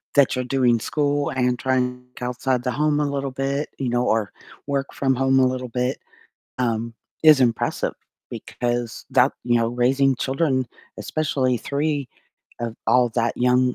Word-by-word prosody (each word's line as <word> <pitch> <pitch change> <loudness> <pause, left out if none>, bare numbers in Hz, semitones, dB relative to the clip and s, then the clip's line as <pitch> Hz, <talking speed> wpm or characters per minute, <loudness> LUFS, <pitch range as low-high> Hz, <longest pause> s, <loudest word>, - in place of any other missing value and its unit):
that 140 -2 +5
you're 125 0 -2
doing 125 -2 +2
school 145 +3 0
and 125 -2 0
trying 125 -1 -1
c - - -7
outside 125 0 -1
the 125 - -1
home 150 +2 +1
a - - +1
little 140 -1 -2
bit, 135 +2 -2
you 130 - -1
know, 120 +1 +1
or 110 -3 +1 0.4
work 140 -1 -2
from 135 -1 +1
home 135 +1 +3
a 130 - +5
little 130 0 -2
bit, 125 +2 -1 0.6
um, 115 -2 -1 0.3
is 155 -3 +8
impressive 120 -3 +1 0.4
because 120 -2 -3
that 130 0 +4
you 120 -1 +3
know, 115 0 +1
raising 130 +3 +2
children, 135 -1 0 0.3
especially 135 -5 0
3 140 +1 -2 0.5
of 115 -1 -3
all 125 -1 +4
that 115 +1 -1
young 125 0 +2
130 Hz, 160 wpm, -23 LUFS, 120-135 Hz, 0.6 s, is